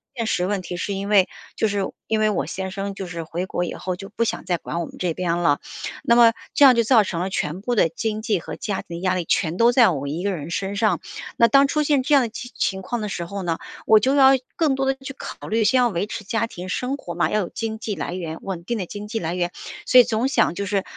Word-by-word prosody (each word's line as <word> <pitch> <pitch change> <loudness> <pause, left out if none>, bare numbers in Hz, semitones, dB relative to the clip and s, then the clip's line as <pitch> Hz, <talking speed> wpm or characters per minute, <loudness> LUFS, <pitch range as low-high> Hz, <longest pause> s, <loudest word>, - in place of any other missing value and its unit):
现 230 -2 -2
实 180 - +1
问 195 0 -1
题 175 0 -6
是 200 +3 -2
因 200 +1 -4
为， 195 -3 +5 0.3
就 220 - +1
是 200 -1 -1 0.2
因 220 - 0
为 215 0 +3
我 205 - -1
先 190 0 -4
生 195 +1 -4
就 190 -1 -6
是 170 -1 -5
回 170 +3 -4
国 175 - -2
以 175 - -4
后 185 -1 -4
就 195 +2 -9
不 230 +2 -1
想 230 - -3
再 175 - 0
管 170 - -4
我 170 - -2
们 - - -12
这 175 -3 -1
边 175 -2 -1
了， 145 -5 +2 0.4
那 235 - +4
么 230 -1 +7 0.2
这 290 -3 +6
样 255 - +8
就 235 - +3
造 230 -1 +5
成 175 -3 -4
了 185 +2 -2
全 170 +1 -2
部 245 +3 -1
的 205 -7 +3
经 215 +6 -3
济 215 -4 0
和 - - -7
家 200 -2 -3
庭 170 - -7
的 - - -8
压 185 -1 +1
力 180 - -2
全 160 +1 0
都 235 +3 +5
在 240 -3 +6
我 140 -5 -3
一 155 +5 -3
个 200 +1 0
人 165 -2 -5
身 195 +3 -2
上。 205 -4 +2 0.4
那 235 - +6
当 275 +2 +5
出 305 +2 0
现 285 -3 +2
这 295 - +1
样 275 - +7
的 235 - -2
情 245 +2 -8
情 190 0 -1
况 240 +4 -3
的 210 - -3
时 175 -2 -4
候 200 +3 -5
呢， 170 -3 -1 0.3
我 220 -1 +7
就 260 +5 +2
要 270 -1 +7 0.3
更 310 -5 +2
多 270 0 -1
的 270 - +2
去 275 0 -6
考 - - -8
虑 225 +1 +1
先 260 +5 +3
要 245 - +4
维 195 -2 -1
持 210 - -6
家 225 +3 0
庭 185 -5 -8
生 250 +7 -1
活 175 - -7
嘛， 175 - +1
要 215 - +2
有 185 - -2
经 220 -1 -4
济 215 -2 -3
来 170 +1 -4
源， 165 -3 -5
稳 185 -3 -5
定 235 +1 -2
的 190 - -3
经 205 +3 -7
济 225 +2 -3
来 170 -2 -3
源， 175 -1 -1 0.4
所 255 - +7
以 - - +9
总 235 +2 0
想 270 - +2
就 200 +3 -3
是， 200 -1 0
200 Hz, 310 characters per minute, -23 LUFS, 180-230 Hz, 0.4 s, 以